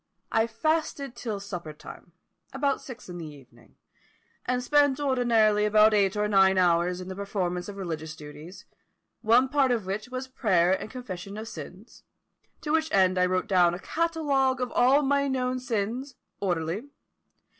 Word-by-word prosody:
I 225 Hz, 0 st, +2 dB
fasted 280 Hz, +2 st, -2 dB
till 220 Hz, -4 st, -4 dB
supper 175 Hz, -6 st, -7 dB
time, 160 Hz, +2 st, -13 dB, 0.4 s
about 275 Hz, 0 st, 0 dB
six 250 Hz, -2 st, -10 dB
in 175 Hz, -1 st, -7 dB
the 165 Hz, -, -6 dB
evening, 130 Hz, -5 st, -16 dB, 0.7 s
and 250 Hz, 0 st, 0 dB
spent 285 Hz, 0 st, +3 dB
ordinarily 235 Hz, -6 st, +2 dB
about 215 Hz, +1 st, +5 dB
eight 200 Hz, -1 st, +2 dB
or 210 Hz, 0 st, +1 dB
nine 190 Hz, -2 st, +4 dB
hours 180 Hz, 0 st, +2 dB
in 180 Hz, -, -8 dB
the 190 Hz, -, -6 dB
performance 185 Hz, -2 st, -3 dB
of 200 Hz, -, -8 dB
religious 160 Hz, -4 st, -5 dB
duties; 155 Hz, +5 st, -11 dB, 0.6 s
one 235 Hz, +4 st, +4 dB
part 275 Hz, -1 st, +2 dB
of 235 Hz, -5 st, 0 dB
which 210 Hz, +5 st, -4 dB
was 255 Hz, +1 st, -5 dB
prayer 185 Hz, -9 st, +2 dB
and 190 Hz, -, -3 dB
confession 200 Hz, -5 st, -7 dB
of 220 Hz, +1 st, -6 dB
sins, 180 Hz, +6 st, -10 dB, 0.6 s
to 300 Hz, -1 st, -3 dB
which 320 Hz, 0 st, +1 dB
end 185 Hz, -1 st, +3 dB
I 180 Hz, -, +4 dB
wrote 185 Hz, 0 st, 0 dB
down 175 Hz, -3 st, +3 dB
a -, -, -8 dB
catalogue 290 Hz, -4 st, 0 dB
of 250 Hz, -1 st, -2 dB
all 270 Hz, +4 st, +4 dB
my 280 Hz, 0 st, +2 dB
known 255 Hz, -1 st, -1 dB
sins, 245 Hz, +2 st, -3 dB, 0.2 s
orderly. 180 Hz, -, -2 dB
215 Hz, 165 wpm, -27 LUFS, 180-260 Hz, 0.7 s, about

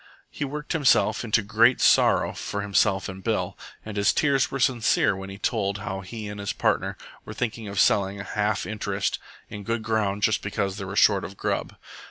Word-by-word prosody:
He -, -, -4 dB
worked 150 Hz, +3 st, -4 dB
himself 150 Hz, -6 st, +3 dB
into 110 Hz, -1 st, +2 dB
a -, -, -11 dB
great 115 Hz, +4 st, +4 dB
sorrow -, -, +4 dB
for 100 Hz, 0 st, -4 dB
himself 100 Hz, -1 st, +1 dB
and 95 Hz, -1 st, -8 dB
Bill, -, -, -1 dB, 0.3 s
and 105 Hz, -1 st, -6 dB
his 100 Hz, 0 st, +3 dB
tears 135 Hz, -4 st, +2 dB
were 135 Hz, -, -4 dB
sincere 120 Hz, -6 st, +2 dB
when 95 Hz, 0 st, -7 dB
he 95 Hz, -, -8 dB
told 100 Hz, -2 st, -1 dB
how 95 Hz, -1 st, -5 dB
he 105 Hz, +3 st, -7 dB
and 105 Hz, 0 st, -7 dB
his 100 Hz, -, -3 dB
partner -, -, 0 dB, 0.3 s
were 105 Hz, -, -9 dB
thinking 115 Hz, -2 st, -3 dB
of 100 Hz, -1 st, -3 dB
selling 100 Hz, 0 st, +2 dB
a -, -, -5 dB
half 105 Hz, 0 st, -1 dB
interest 100 Hz, -2 st, -2 dB, 0.3 s
in 105 Hz, -, -8 dB
good 115 Hz, +2 st, -2 dB
ground 105 Hz, -2 st, -1 dB
just 110 Hz, -, +2 dB
because 100 Hz, -1 st, -2 dB
they 100 Hz, -, -5 dB
were 100 Hz, +2 st, -6 dB
short 100 Hz, -2 st, +4 dB
of 95 Hz, -, -8 dB
grub. -, -, -2 dB
105 Hz, 205 wpm, -25 LUFS, 100-115 Hz, 0.3 s, great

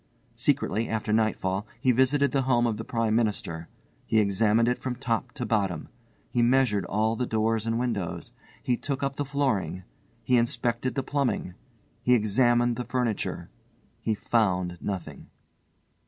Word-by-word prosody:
Secretly, 115 Hz, +2 st, 0 dB
after 110 Hz, -1 st, -1 dB
nightfall, 105 Hz, -2 st, 0 dB
he 130 Hz, +1 st, +3 dB
visited 135 Hz, +3 st, +3 dB
the 135 Hz, -, +2 dB
home 125 Hz, -2 st, +2 dB
of 115 Hz, -3 st, 0 dB
the -, -, -5 dB
Prime 115 Hz, -3 st, 0 dB
Minister. 100 Hz, -7 st, -1 dB, 0.4 s
He 110 Hz, -, +2 dB
examined 105 Hz, +2 st, +3 dB
it 125 Hz, -, +1 dB
from 130 Hz, -1 st, -2 dB
top 120 Hz, -3 st, -2 dB
to 125 Hz, -4 st, -4 dB
bottom. 100 Hz, -9 st, -1 dB, 0.4 s
He 120 Hz, -, +2 dB
measured 120 Hz, -4 st, +3 dB
all 110 Hz, +2 st, +1 dB
the 125 Hz, +1 st, -2 dB
doors 110 Hz, 0 st, 0 dB
and 115 Hz, 0 st, +1 dB
windows. 115 Hz, -8 st, -3 dB, 0.3 s
He 125 Hz, -, +1 dB
took 140 Hz, -2 st, -3 dB
up 140 Hz, 0 st, -2 dB
the 145 Hz, -, -1 dB
flooring. 135 Hz, -10 st, -1 dB, 0.4 s
He 125 Hz, +3 st, +3 dB
inspected 120 Hz, +1 st, -1 dB
the 135 Hz, -, -1 dB
plumbing. 135 Hz, -9 st, -1 dB, 0.5 s
He 125 Hz, -, +4 dB
examined 120 Hz, +2 st, +2 dB
the 125 Hz, -, -3 dB
furniture. 125 Hz, -4 st, -2 dB, 0.5 s
He 110 Hz, -, -1 dB
found 90 Hz, -6 st, 0 dB
nothing. 95 Hz, -4 st, -5 dB
115 Hz, 155 wpm, -27 LUFS, 105-125 Hz, 0.5 s, He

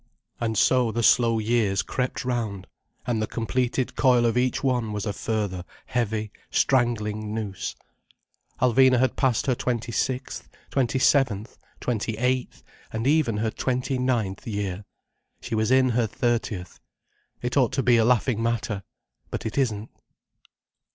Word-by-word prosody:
And 110 Hz, -2 st, -1 dB
so 125 Hz, 0 st, +3 dB
the 115 Hz, +2 st, -1 dB
slow 115 Hz, 0 st, +4 dB
years 110 Hz, -3 st, +1 dB
crept 125 Hz, 0 st, -3 dB
round, 110 Hz, -6 st, -2 dB, 0.4 s
and 115 Hz, -3 st, 0 dB
the 110 Hz, -, -1 dB
completed 125 Hz, +2 st, -1 dB
coil 125 Hz, -3 st, +4 dB
of 115 Hz, -, +2 dB
each 125 Hz, +2 st, +1 dB
one 125 Hz, -5 st, 0 dB
was 105 Hz, -1 st, -3 dB
a 105 Hz, -, -2 dB
further 100 Hz, -4 st, -2 dB, 0.2 s
heavy, 110 Hz, -3 st, -2 dB, 0.2 s
strangling 110 Hz, -4 st, +1 dB
noose. 105 Hz, -4 st, -4 dB, 0.8 s
Alvina 130 Hz, +1 st, +5 dB
had 130 Hz, +1 st, +2 dB
passed 130 Hz, -5 st, +1 dB
her 130 Hz, -, +2 dB
twenty 120 Hz, -1 st, -2 dB
sixth, 130 Hz, +3 st, -2 dB, 0.2 s
twenty 130 Hz, -1 st, +1 dB
seventh, 125 Hz, -6 st, +2 dB, 0.2 s
twenty 110 Hz, -2 st, -2 dB
eighth 125 Hz, +1 st, -1 dB, 0.3 s
and 110 Hz, +1 st, -3 dB
even 140 Hz, -6 st, +2 dB
her 110 Hz, +1 st, 0 dB
twenty 130 Hz, +2 st, -1 dB
ninth 120 Hz, -3 st, -1 dB
year. 100 Hz, -2 st, -3 dB, 0.5 s
She -, -, -7 dB
was 110 Hz, 0 st, +1 dB
in 130 Hz, 0 st, +4 dB
her 120 Hz, -1 st, +1 dB
thirtieth. 110 Hz, -6 st, -2 dB, 0.6 s
It 125 Hz, -, -2 dB
ought 130 Hz, -4 st, +3 dB
to 135 Hz, -, 0 dB
be 120 Hz, -1 st, +5 dB
a 115 Hz, -, +4 dB
laughing 120 Hz, -1 st, +2 dB
matter. 115 Hz, -3 st, -1 dB, 0.5 s
But -, -, -5 dB
it 110 Hz, +2 st, -3 dB
isn't. 115 Hz, -6 st, -1 dB
115 Hz, 145 wpm, -25 LUFS, 110-125 Hz, 0.8 s, Alvina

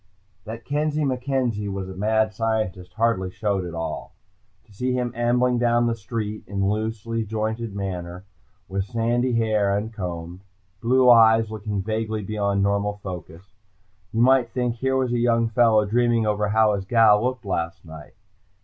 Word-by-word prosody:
_ -, -, -42 dB
That 115 Hz, +1 st, -8 dB
Kenzie 150 Hz, +1 st, 0 dB
MacKenzie 125 Hz, -5 st, -1 dB
was 95 Hz, -1 st, -4 dB
a 95 Hz, -, -7 dB
mad 110 Hz, +2 st, +1 dB
scientist 100 Hz, -5 st, -2 dB
hardly 110 Hz, -5 st, 0 dB
showed 100 Hz, 0 st, -1 dB
at 85 Hz, -1 st, -7 dB
all. 80 Hz, 0 st, -5 dB, 0.5 s
To 105 Hz, -, -21 dB
see 125 Hz, +5 st, -1 dB
him 125 Hz, -1 st, -1 dB
ambling 120 Hz, +1 st, +2 dB
down 120 Hz, 0 st, +2 dB
the 120 Hz, -, +1 dB
street 110 Hz, 0 st, -5 dB
in 95 Hz, -1 st, -1 dB
loose 110 Hz, +1 st, -2 dB, 0.2 s
jointed 110 Hz, 0 st, -3 dB
manner, 90 Hz, -2 st, -5 dB, 0.4 s
with 95 Hz, 0 st, -2 dB
sandy 120 Hz, +2 st, 0 dB
hair 110 Hz, -3 st, +1 dB
uncombed, 90 Hz, -4 st, -4 dB, 0.4 s
blue 125 Hz, +2 st, +3 dB
eyes 115 Hz, -2 st, +6 dB
looking 105 Hz, -2 st, -3 dB
vaguely 110 Hz, 0 st, -2 dB
beyond 100 Hz, -1 st, 0 dB
normal 100 Hz, +1 st, 0 dB
focus, 90 Hz, +1 st, -9 dB, 0.6 s
you 115 Hz, -, 0 dB
might 130 Hz, -1 st, +4 dB
think 120 Hz, 0 st, -2 dB
here 130 Hz, +2 st, 0 dB
was 130 Hz, -2 st, 0 dB
a 120 Hz, -, +1 dB
young 115 Hz, -1 st, +2 dB
fellow 115 Hz, -2 st, +4 dB
dreaming 120 Hz, +1 st, +2 dB
over 105 Hz, -1 st, 0 dB
how 110 Hz, 0 st, +3 dB
his 95 Hz, -1 st, -3 dB
gal 110 Hz, -1 st, +5 dB
looked 125 Hz, -3 st, -2 dB
last 85 Hz, -3 st, -3 dB
night. 80 Hz, -2 st, -12 dB
110 Hz, 160 wpm, -23 LUFS, 100-120 Hz, 0.6 s, eyes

